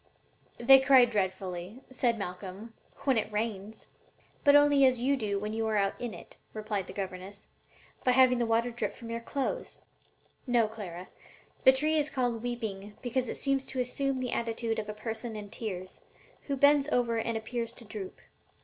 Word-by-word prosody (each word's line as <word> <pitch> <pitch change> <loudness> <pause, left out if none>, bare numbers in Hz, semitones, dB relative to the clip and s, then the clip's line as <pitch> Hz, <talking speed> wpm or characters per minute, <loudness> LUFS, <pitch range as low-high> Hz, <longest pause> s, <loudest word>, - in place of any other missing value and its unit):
"They 270 +3 +8
cry 265 -2 +7
dreadfully," 190 0 -3
said 245 -3 +1
Malcolm, 195 +3 -7 0.3
"when 265 -5 +3
it 215 - -4
rains." 210 0 -4 0.6
"But 285 -1 +6
only 290 -1 +6
as 255 -2 +4
you 270 +3 +2
do 210 -6 -2
when 210 +2 -3
you 225 0 -1
are 220 - 0
out 195 -1 +1
in 235 -6 -4
it," - - -13 0.2
replied 210 -3 -3
his 185 - -9
governess 195 +1 -6 0.5
"by 250 - +4
having 255 -1 +5
the 235 - +1
water 230 +2 +1
drip 240 - -3
from 230 -2 -9
your 230 - -2
clothes. 280 - -3 0.7
No, 240 -3 +3
Clara, 185 -5 -8 0.6
the 260 - +10
tree 305 +4 +1
is 300 0 0
called 245 -5 -1
'weeping' 215 -4 -5
because 250 0 -1
it - - -4
seems 275 -1 +1
to 260 - -2
'assume 270 +2 -1
the 250 -1 -2
attitude 230 -1 -1
of 210 -1 -5
a - - -3
person 225 +1 -5
in 205 -1 -8
tears, 185 -5 -6 0.5
who 280 -1 -1
bends 285 +1 +5
over 235 -4 +1
and 230 0 -1
appears 230 +1 -4
to 235 - -11
droop.' 205 -3 -8
230 Hz, 180 wpm, -30 LUFS, 210-255 Hz, 0.7 s, the